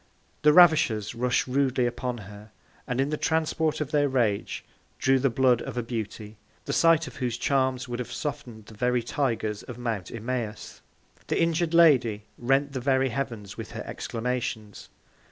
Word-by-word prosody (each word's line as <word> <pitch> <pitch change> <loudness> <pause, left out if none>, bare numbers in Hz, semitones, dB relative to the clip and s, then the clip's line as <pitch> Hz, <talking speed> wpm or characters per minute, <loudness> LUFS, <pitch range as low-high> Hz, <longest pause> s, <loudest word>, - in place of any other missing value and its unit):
The 150 - +6
Ravishers 150 - +5
rush'd 125 +2 0
rudely 130 -1 +1
upon 120 0 -3
her, 105 0 -11 0.4
and 125 0 -2
in 135 +2 +1
the 150 - -1
Transport 160 0 0
of 150 -1 -3
their 145 -2 +2
Rage, 115 -6 -1 0.3
drew 135 0 +3
the 135 +1 +2
Blood 125 -1 +3
of - - -6
a 120 - 0
Beauty, 110 -2 -6 0.3
the - - -2
Sight 165 -1 +4
of - - -10
whose 120 -2 -2
Charms 130 -1 0
would 120 0 -4
have 125 - -5
soften'd 120 -6 -5
the 110 - -13
very 125 +2 0
Tigers 115 -5 -1
of 125 - -9
Mount 115 -6 -3
Imaüs. 115 -2 -5 0.5
The - - 0
injur'd 165 0 +1
Lady 125 -11 +5 0.2
rent 135 +3 +1
the 130 - -3
very 130 0 +2
Heavens 115 -5 -5
with - - -7
her - - -5
Exclamations. 115 -3 -4
125 Hz, 170 wpm, -26 LUFS, 115-140 Hz, 0.5 s, The